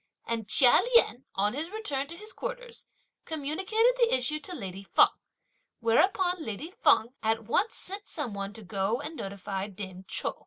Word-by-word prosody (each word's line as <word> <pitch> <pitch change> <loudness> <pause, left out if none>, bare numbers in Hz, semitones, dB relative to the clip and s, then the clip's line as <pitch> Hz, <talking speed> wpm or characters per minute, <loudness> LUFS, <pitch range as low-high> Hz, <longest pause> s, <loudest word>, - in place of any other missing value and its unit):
And 225 -2 -3
Chia 250 -4 +7 0.2
Lien, 265 - +4
on 205 +2 +1
his 305 +5 -2
return 295 -11 -2
to 335 - -8
his 425 +3 -5
quarters, - - -6 0.4
communicated 380 - +1
the 475 -1 +4
issue 260 +4 0
to 360 +3 -5
lady 195 - -6
Feng; 195 - +5 0.7
whereupon 355 - +2
lady 285 - -5
Feng 235 - +3
at 225 +1 0
once 380 - +1
sent 400 +2 -6
some 280 -9 -4
one 200 0 -4
to 220 0 -8
go 200 +4 -1
and 300 +3 -6
notify 195 -3 -4
dame 190 -2 -8
Chou. - - -1
270 Hz, 165 wpm, -29 LUFS, -, 0.7 s, Chia